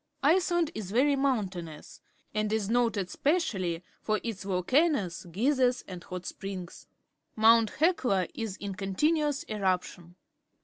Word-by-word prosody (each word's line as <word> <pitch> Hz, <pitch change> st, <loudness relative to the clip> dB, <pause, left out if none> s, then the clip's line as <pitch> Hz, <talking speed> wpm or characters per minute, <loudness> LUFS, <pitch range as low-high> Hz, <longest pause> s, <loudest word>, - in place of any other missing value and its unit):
Iceland 345 Hz, 0 st, +3 dB
is 210 Hz, -4 st, -5 dB
very 270 Hz, +7 st, +3 dB
mountainous, 190 Hz, -, -3 dB, 0.3 s
and 215 Hz, 0 st, 0 dB
is 215 Hz, -1 st, 0 dB
noted 225 Hz, -6 st, +1 dB
specially 195 Hz, -, 0 dB, 0.2 s
for 215 Hz, -1 st, 0 dB
Tts 225 Hz, -5 st, -5 dB
volcanoes, 195 Hz, -, +1 dB
geysers, 250 Hz, -, +2 dB
and 180 Hz, -2 st, -8 dB
hot 180 Hz, -1 st, -6 dB
^ -, -, -8 dB
rings. 190 Hz, -2 st, -7 dB, 0.5 s
Mount 225 Hz, 0 st, +5 dB
Hichi 255 Hz, -, +2 dB
is 220 Hz, -5 st, -4 dB
in 200 Hz, -1 st, -5 dB
continuous 290 Hz, -, 0 dB
eruptioa. 185 Hz, -4 st, -2 dB
215 Hz, 125 wpm, -29 LUFS, 185-270 Hz, 0.5 s, Mount